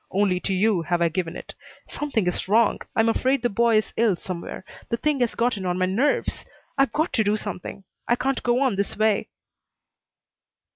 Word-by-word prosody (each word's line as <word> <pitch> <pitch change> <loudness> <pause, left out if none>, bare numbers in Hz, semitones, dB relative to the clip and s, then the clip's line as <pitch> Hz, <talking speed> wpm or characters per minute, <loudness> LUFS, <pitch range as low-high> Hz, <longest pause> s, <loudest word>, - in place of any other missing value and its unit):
Only 190 -2 +1
to 195 - -2
you 200 -1 +2
have 175 +1 0
I 170 -1 +3
given 170 0 -3
it. - - -8 0.3
Something 280 -9 -2
is 180 - -2
wrong. 220 +2 +3 0.2
I'm 225 - +3
afraid 255 +3 +1
the 240 - +2
boy 230 +1 +3
is 215 - -1
ill 225 -4 +3
somewhere. 180 +1 -7 0.2
The 235 - 0
thing 295 +3 0
has 245 -2 0
gotten 235 -4 0
on 180 -1 -1
my 185 - +2
nerves. 235 +11 0 0.3
I've 275 -1 +2
got 315 +3 -1
to 220 - +3
do 210 +1 +1
something. 200 -1 -6 0.2
I 240 - +3
can't 265 +2 -1
go 245 +1 +1
on 255 -8 +1
this 200 - -2
way." 215 -1 +1
215 Hz, 195 wpm, -24 LUFS, 185-240 Hz, 0.3 s, I